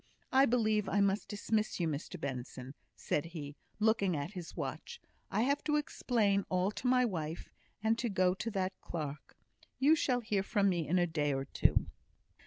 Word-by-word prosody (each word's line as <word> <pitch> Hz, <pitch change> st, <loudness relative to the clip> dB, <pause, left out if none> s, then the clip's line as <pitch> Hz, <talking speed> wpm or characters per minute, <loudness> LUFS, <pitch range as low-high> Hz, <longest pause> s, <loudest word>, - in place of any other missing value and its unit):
I 270 Hz, +1 st, +6 dB
believe 215 Hz, -4 st, +2 dB
I 205 Hz, -, +2 dB
must 200 Hz, +1 st, +2 dB
dismiss 215 Hz, +1 st, -1 dB
you, 170 Hz, -, +1 dB
Mr 160 Hz, +4 st, -4 dB
Benson," 130 Hz, -2 st, -5 dB, 0.2 s
said 150 Hz, -, -1 dB
he, 155 Hz, -4 st, -7 dB, 0.2 s
looking 210 Hz, -6 st, +2 dB
at 145 Hz, +5 st, -4 dB
his 180 Hz, -4 st, -8 dB
watch; 150 Hz, 0 st, -5 dB, 0.3 s
"I 205 Hz, -, +1 dB
have 280 Hz, +3 st, +1 dB
to 300 Hz, -1 st, +2 dB
explain 230 Hz, -9 st, +1 dB
all 185 Hz, +2 st, +1 dB
to 245 Hz, -, -4 dB
my 250 Hz, 0 st, +4 dB
wife, 165 Hz, -6 st, -4 dB, 0.3 s
and 225 Hz, +1 st, +2 dB
to 240 Hz, -, 0 dB
go 185 Hz, -2 st, +3 dB
to 210 Hz, +4 st, -4 dB
that 190 Hz, -3 st, -1 dB
clerk. 150 Hz, -3 st, -6 dB, 0.4 s
You 295 Hz, +4 st, +5 dB
shall 250 Hz, -5 st, +1 dB
hear 210 Hz, -3 st, 0 dB
from 200 Hz, 0 st, +2 dB
me 175 Hz, -4 st, 0 dB
in 180 Hz, -, +2 dB
a 175 Hz, -, +4 dB
day 150 Hz, -4 st, 0 dB
or 135 Hz, 0 st, -2 dB
two." -, -, +2 dB
195 Hz, 185 wpm, -33 LUFS, 160-225 Hz, 0.4 s, I